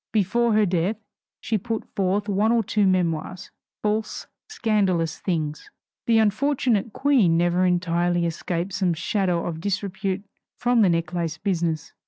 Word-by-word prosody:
Before 225 +3 +2
her 215 0 +4
death 180 +3 0 0.5
she 220 -2 -1
put 225 +3 -4
forth 200 +2 0
one 205 +2 +2
or 235 -1 +3
two 205 0 +1
memoirs, 180 -1 -1 0.3
false, 210 +1 -1 0.2
scandalous 195 - 0
things. 155 -5 -3 0.4
The 230 -1 +4
unfortunate 225 0 +1
Queen 225 -12 +3
never 175 +2 +2
entirely 175 -1 +1
escaped 170 +2 -3
some 180 -2 +1
shadow 180 0 0
of 165 -2 -4
disrepute 195 0 -2 0.3
from 245 -1 +2
the 195 - +5
necklace 165 -1 -1
business. 170 -4 -2
190 Hz, 135 wpm, -24 LUFS, 170-215 Hz, 0.5 s, the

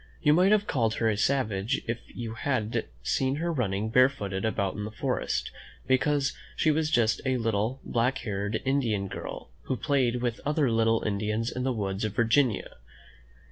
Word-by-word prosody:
Tou 150 - +6
might 180 +5 +5
have 210 -1 +4
called 115 - 0
her 115 - +1
a - - 0
savage 110 -1 0
if 115 +1 -2
you 115 -2 -6
had 115 -2 -1 0.2
seen 130 - +1
her 170 +3 -1
running 110 -5 -1
barefooted 110 -7 +2
about 100 -3 0
in 105 - -5
the 105 - -4
forest, 110 - -2 0.3
because 140 +2 +2 0.2
she 155 - +3
was 155 0 +1
just 115 -6 +2
a 130 -1 +1
little, 115 +2 0
black 125 +3 0
haired 105 -2 -3
Indian 120 -8 +1
girl, - - -7
who 130 - -1
played 130 -5 +1
with 120 -1 -2
other 145 -3 +1
little 115 0 +2
Indians 105 +2 -1
in 125 - -4
the 130 +1 0
woods 100 -3 -2
of 110 -1 -2
Vir 120 - +3
ginia. 120 -1 +1
115 Hz, 180 wpm, -28 LUFS, 105-135 Hz, 0.3 s, Tou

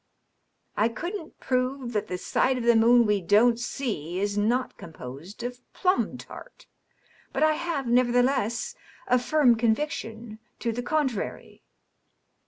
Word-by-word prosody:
" - - -48 0.3
I 220 +2 +2
couldn't 345 - -6
prove 255 -1 -1
that 210 - -1
the 180 - -3
side 260 +7 +1
of 245 - -3
the 235 0 +5
moon 235 +1 +6
we 210 -2 +1
don't 230 +6 +4
see 210 - -3
is 200 +1 -1
not 235 +5 0
composed 160 - -10
of 245 0 -5
plum 370 +1 +1
tart; - - -12 0.7
but - - 0
I 310 - +5
have, 320 -4 -2
nevertheless, 245 - +2 0.3
a 250 - +3
firm 255 -2 +4
conviction 225 -2 -2 0.2
to 235 - -2
the 240 +2 -3
contrary.' 265 -6 -2
240 Hz, 140 wpm, -26 LUFS, 220-265 Hz, 0.7 s, moon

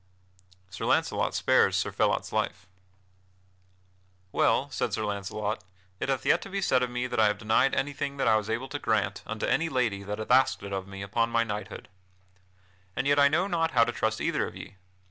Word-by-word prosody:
[Sidenote: 90 0 -31
Sir - - -4
Launcelot - - +1
spares - - +3
Sir - - -1
Phelot's - - 0
life] 90 - -2 1.7
"Well," - - +2
said - - -1
Sir 110 - -1
Launcelot, 105 0 -3 0.4
"it - - -2
hath 135 -2 -1
yet - - +3
to - - -8
be 195 0 -2
said 130 -9 +2
of 125 - 0
me 125 0 -2
that 125 - -2
I 110 - +6
have 105 -1 0
denied 110 +6 +2
anything 140 0 -2
that 135 - 0
I 110 - +5
was 110 0 -1
able 115 +4 -2
to 145 - -4
grant 105 -4 0
unto 110 -1 -3
any 165 0 +1
lady 115 -8 0
that 105 +1 -5
hath 110 +2 -4
asked 130 -5 +4
it 100 0 -6
of 95 -1 -3
me 95 0 -7
upon 115 +4 0
my 115 0 +2
knighthood. 105 -2 -6 1.1
And - - -1
yet 145 0 +3
I 140 - +7
know 160 +6 +2
not 165 -4 0
how 115 - +8
to 120 - -1
trust 110 -1 -1
either - - 0
of - - -10
ye. 100 - -10
110 Hz, 210 wpm, -28 LUFS, 100-135 Hz, 1.7 s, how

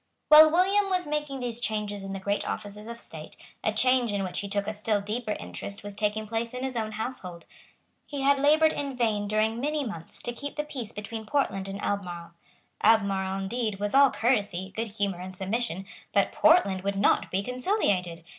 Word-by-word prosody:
While 310 +1 +10
William 390 +4 +3
was 365 -2 0
making 295 -3 -3
these 240 -1 -3
changes 210 -3 -2
in 195 - -6
the 195 - -4
great 200 +2 -1
offices 210 +1 -6
of 235 0 -7
state, - - -7 0.3
a - - +2
change 255 -3 +3
in 200 -1 -1
which 185 -1 -2
he 200 - -4
took 200 0 0
a 215 - -3
still 210 0 0
deeper 215 +2 -3
interest 200 +1 -6
was 205 0 -5
taking 210 +1 -1
place 230 +2 -3
in 250 - -4
his 265 -1 -3
own 220 -2 -2
household. 210 -7 -5 0.6
He 285 -2 -4
had 280 0 +4
laboured 310 +3 +5
in 280 -3 -4
vain 215 -4 +1
during 215 +2 +1
many 295 +2 -1
months 170 -8 -8
to 240 - -2
keep 285 +4 -6
the 300 - -1
peace 255 -7 -6
between 220 +1 -7
Portland 200 -9 0
and 195 +1 -5
Albemarle. 175 -4 -3 0.5
Albemarle, 195 -3 +2
indeed, 215 0 -2
was 205 0 -1
all 275 0 +7
courtesy, 200 -7 0
good 225 +1 -2
humour, 200 -4 -1
and 185 0 -6
submission; 195 -1 -2 0.3
but - - +3
Portland 200 - +4
would 200 +1 -2
not 200 - +3
be 195 +2 -1
conciliated. 205 - 0
215 Hz, 195 wpm, -27 LUFS, 200-255 Hz, 0.6 s, While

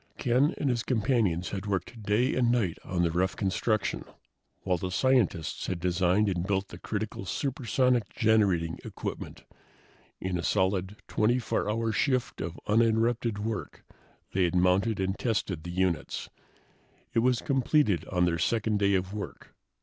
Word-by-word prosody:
Ken 130 +3 +2
and 145 - -1
his 120 -1 0
companions 110 -8 +1
had 100 +1 -4
worked 100 +4 -3
day 105 +6 +1
and 120 -2 +2
night 110 -9 0
on 90 -1 -1
the 85 - +2
rough 90 +3 0
construction, 105 +2 0 0.6
while 90 -2 0
the 95 - -3
scientists 110 -6 +1
had 90 -2 -2
designed 90 +3 +2
and 90 -2 -1
built 100 -1 0
the 85 - -10
critical 105 -1 -4
supersonic 125 - 0
generating 100 -7 +2
equipment. - - -6 0.8
In 90 -1 -2
a - - -3
solid, 95 +1 +1
24 115 -1 +1
hour 115 +1 0
shift 130 +3 0
of 80 +2 -5
uninterrupted 115 0 +2
work 110 +1 -4 0.5
they 95 -1 +3
had 85 - -1
mounted 95 +5 +2
and 95 0 -1
tested 105 -8 -1
the 85 - -8
units. 90 -1 -1 0.8
It - - +3
was 125 0 +3
completed 135 - +2
on 90 -1 +1
their 85 -1 0
second 110 +3 +1
day 100 -1 +3
of 95 +1 -1
work. 105 -1 -7
100 Hz, 150 wpm, -28 LUFS, 90-115 Hz, 0.8 s, they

